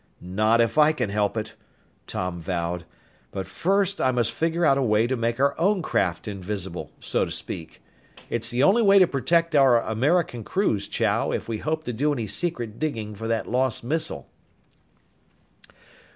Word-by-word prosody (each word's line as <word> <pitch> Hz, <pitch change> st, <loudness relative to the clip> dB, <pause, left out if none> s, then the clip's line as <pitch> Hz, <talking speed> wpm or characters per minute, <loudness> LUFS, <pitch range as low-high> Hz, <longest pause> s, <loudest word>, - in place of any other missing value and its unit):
"Not 110 Hz, +6 st, +2 dB
if 115 Hz, +6 st, +1 dB
I 150 Hz, +1 st, +6 dB
can 125 Hz, -9 st, -2 dB
help 105 Hz, +1 st, 0 dB
it," 110 Hz, -, -4 dB, 0.5 s
Tom 90 Hz, -1 st, -3 dB
vowed. 85 Hz, 0 st, -3 dB, 0.4 s
"But 95 Hz, -1 st, -5 dB
first 195 Hz, +2 st, 0 dB
I 130 Hz, -, +3 dB
must 120 Hz, -3 st, +1 dB
figure 165 Hz, +7 st, 0 dB
out 140 Hz, -2 st, +4 dB
a -, -, +1 dB
way 110 Hz, -2 st, +3 dB
to 130 Hz, +2 st, 0 dB
make 115 Hz, 0 st, -1 dB
our 140 Hz, +1 st, +3 dB
own 190 Hz, +1 st, +2 dB
craft 90 Hz, -, -1 dB
invisible, 95 Hz, -2 st, -5 dB
so -, -, 0 dB
to -, -, -3 dB
speak. 80 Hz, -, -5 dB, 0.4 s
It's 115 Hz, 0 st, -2 dB
the 125 Hz, +2 st, +1 dB
only 205 Hz, +9 st, +5 dB
way 200 Hz, -2 st, +6 dB
to 190 Hz, -, +7 dB
protect 165 Hz, +3 st, +1 dB
our 135 Hz, -4 st, +6 dB
American 125 Hz, +3 st, 0 dB
crews, 105 Hz, -, 0 dB
Chow, 110 Hz, 0 st, 0 dB
if -, -, -3 dB
we 110 Hz, -2 st, -3 dB
hope 155 Hz, +3 st, -2 dB
to 125 Hz, -, -4 dB
do 145 Hz, +7 st, +1 dB
any 120 Hz, -6 st, -2 dB
secret 120 Hz, -, -3 dB
digging 115 Hz, -9 st, -3 dB
for 110 Hz, +2 st, -6 dB
that 115 Hz, -1 st, -1 dB
lost 125 Hz, -1 st, 0 dB
missile." 155 Hz, +7 st, -2 dB
120 Hz, 175 wpm, -24 LUFS, 105-155 Hz, 0.5 s, to